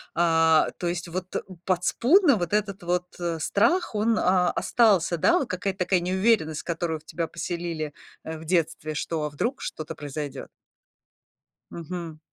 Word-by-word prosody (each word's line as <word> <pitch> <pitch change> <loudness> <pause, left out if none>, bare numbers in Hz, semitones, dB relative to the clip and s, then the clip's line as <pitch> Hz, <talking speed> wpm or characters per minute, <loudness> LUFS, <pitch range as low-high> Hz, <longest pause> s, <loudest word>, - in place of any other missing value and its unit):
а, 160 -2 +4
то 175 - -3
есть 175 0 -3
вот 185 +1 -5 0.3
подспудно 245 - +4
вот 175 +2 -3
этот 205 -2 0
вот, 180 +1 0
э, 170 -2 -2
страх, 235 - +2
он, 215 +1 +2
а, 180 -1 +3
остался, 195 -7 +3
да, 345 - +4
вот 270 - -3
какая-то 185 +1 -3
такая 180 0 +2
неуверенность, 185 -3 +1
которую 165 -1 -2
в - - -30
тебя 165 +1 -3
поселили, 170 -4 -4 0.3
э, 160 0 -5
в 160 - -11
детстве, 160 -2 0
что 160 +1 -2
а 150 - -1
вдруг 235 - -2
что-то 155 +1 -5
произойдёт. 145 -2 -6 1.2
Мгм. 170 -2 -6
175 Hz, 150 wpm, -26 LUFS, 160-195 Hz, 1.2 s, а